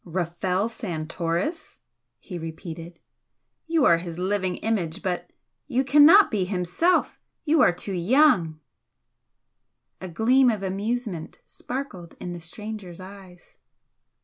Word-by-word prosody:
"Rafel 180 Hz, +3 st, -1 dB
Santoris!" 175 Hz, -, -4 dB, 0.4 s
he 180 Hz, -4 st, -8 dB
repeated 165 Hz, +1 st, -8 dB, 0.7 s
"You 325 Hz, -3 st, +2 dB
are 170 Hz, -1 st, +5 dB
his 170 Hz, -1 st, -7 dB
living 185 Hz, 0 st, -1 dB
image, 195 Hz, -8 st, -2 dB
but 180 Hz, -3 st, -3 dB, 0.4 s
you 265 Hz, -1 st, +1 dB
cannot 300 Hz, +9 st, +7 dB
be 205 Hz, -3 st, 0 dB
himself 185 Hz, -, 0 dB, 0.3 s
you 310 Hz, -1 st, +3 dB
are 180 Hz, -, +6 dB
too 180 Hz, +3 st, -6 dB
young!" 180 Hz, -, +3 dB, 1.4 s
A 190 Hz, -, -5 dB
gleam 245 Hz, +9 st, +3 dB
of 215 Hz, -4 st, -2 dB
amusement 200 Hz, -2 st, -3 dB
sparkled 230 Hz, -10 st, -7 dB
in 180 Hz, -, -5 dB
the 175 Hz, -, -7 dB
stranger's 190 Hz, +1 st, -8 dB
eyes. 185 Hz, -1 st, -13 dB
185 Hz, 115 wpm, -25 LUFS, 175-235 Hz, 1.4 s, cannot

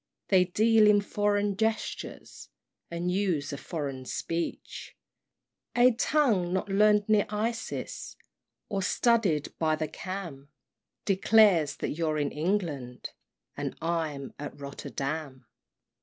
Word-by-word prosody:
They 185 Hz, -2 st, +5 dB
deal 215 Hz, +3 st, +4 dB
in 205 Hz, -1 st, +5 dB
foreign 205 Hz, 0 st, 0 dB
gestures, 220 Hz, +1 st, -3 dB, 0.4 s
And 170 Hz, +1 st, -2 dB
use 180 Hz, -7 st, 0 dB
a -, -, -4 dB
foreign 140 Hz, -6 st, -5 dB
speech; 165 Hz, +6 st, -4 dB, 0.8 s
A 245 Hz, +1 st, +6 dB
tongue 230 Hz, -8 st, +2 dB
not 190 Hz, +2 st, -1 dB
learn'd 210 Hz, +1 st, +4 dB
near 215 Hz, -1 st, +3 dB
Isis, 225 Hz, +3 st, -4 dB, 0.5 s
Or 195 Hz, -1 st, -2 dB
studied 200 Hz, -7 st, +1 dB
by 155 Hz, -1 st, +2 dB
the 155 Hz, 0 st, -2 dB
Cam, 170 Hz, -8 st, -7 dB, 0.6 s
Declares 195 Hz, -5 st, +4 dB
that -, -, -3 dB
you're 155 Hz, -1 st, -1 dB
in 145 Hz, -1 st, 0 dB
England, 150 Hz, -8 st, -2 dB, 0.4 s
And -, -, -4 dB
I'm 160 Hz, -5 st, -2 dB
at 145 Hz, 0 st, -7 dB
Rotterdam. 140 Hz, -1 st, -5 dB
180 Hz, 110 wpm, -28 LUFS, 150-210 Hz, 0.8 s, A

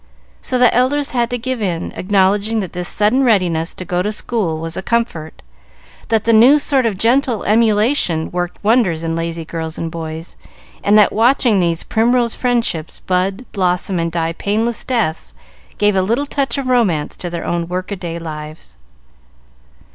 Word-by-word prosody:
So 255 Hz, -, -1 dB
the 245 Hz, -2 st, +4 dB
elders 270 Hz, +4 st, +1 dB
had 240 Hz, -2 st, 0 dB
to 245 Hz, -, -2 dB
give 255 Hz, 0 st, -4 dB
in, 175 Hz, -4 st, -2 dB
acknowledging 200 Hz, +3 st, +1 dB
that 185 Hz, -, -6 dB
this 180 Hz, -1 st, -2 dB
sudden 215 Hz, +6 st, +2 dB
readiness 180 Hz, -8 st, +1 dB
to 185 Hz, -, -7 dB
go 175 Hz, +1 st, -1 dB
to 210 Hz, +3 st, -1 dB
school 205 Hz, -7 st, -2 dB
was 165 Hz, +1 st, -4 dB
a -, -, -3 dB
comfort, 190 Hz, -8 st, -2 dB, 0.6 s
that 220 Hz, -1 st, +1 dB
the 230 Hz, -, +2 dB
new 245 Hz, +7 st, +7 dB
sort 275 Hz, -4 st, +1 dB
of 205 Hz, -4 st, -2 dB
gentle 240 Hz, +2 st, +1 dB
emulation 215 Hz, -, +2 dB
worked 175 Hz, +2 st, -4 dB
wonders 205 Hz, -7 st, +2 dB
in 165 Hz, 0 st, -2 dB
lazy 165 Hz, 0 st, -4 dB
girls 160 Hz, 0 st, -5 dB
and 165 Hz, -1 st, -4 dB
boys, 160 Hz, 0 st, -7 dB, 0.5 s
and 205 Hz, +1 st, +4 dB
that 210 Hz, -, +5 dB
watching 230 Hz, -2 st, +3 dB
these 170 Hz, -2 st, 0 dB
"primrose 235 Hz, +1 st, +1 dB
friendships" 235 Hz, -10 st, -2 dB
bud, 190 Hz, +6 st, -1 dB
blossom, 180 Hz, -1 st, 0 dB
and 165 Hz, 0 st, -1 dB
die 165 Hz, 0 st, -1 dB
painless 220 Hz, +5 st, -1 dB
deaths, 160 Hz, -, -2 dB, 0.4 s
gave 205 Hz, 0 st, +2 dB
a 190 Hz, -, +3 dB
little 230 Hz, +9 st, 0 dB
touch 280 Hz, 0 st, -1 dB
of 275 Hz, -, -3 dB
romance 220 Hz, -12 st, +1 dB
to 175 Hz, -, -5 dB
their 170 Hz, -1 st, -5 dB
own 170 Hz, -1 st, -2 dB
work 185 Hz, +2 st, -4 dB
a -, -, -1 dB
day 170 Hz, -3 st, -6 dB
lives. 155 Hz, -, -8 dB
200 Hz, 175 wpm, -17 LUFS, 170-235 Hz, 0.6 s, new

